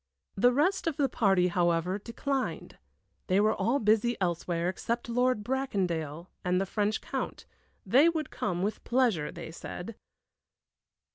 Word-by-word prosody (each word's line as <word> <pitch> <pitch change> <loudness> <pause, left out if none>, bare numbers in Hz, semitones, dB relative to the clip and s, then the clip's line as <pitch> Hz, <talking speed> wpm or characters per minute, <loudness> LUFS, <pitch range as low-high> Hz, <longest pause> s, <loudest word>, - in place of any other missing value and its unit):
The 245 +5 +4
rest 330 +9 +1
of 320 - -1
the 280 - +3
party, 195 -7 +2
however, 175 +2 +1
declined. 260 +5 -3 0.5
They 185 +1 +3
were 215 +1 +4
all 230 +8 +1
busy 220 0 +2
elsewhere, 175 -1 -1
except 235 +6 -2
Lord 245 -2 +1
Bracondale 180 - -2 0.2
and 180 0 +1
the 195 - 0
French 210 +2 -1
Count - - -4 0.4
they 265 - +6
would 320 -2 -3
come, 175 0 -2
with 210 +2 -2
pleasure, 235 - +1
they - - -8
said. 180 +5 -7
210 Hz, 140 wpm, -29 LUFS, 180-250 Hz, 0.5 s, they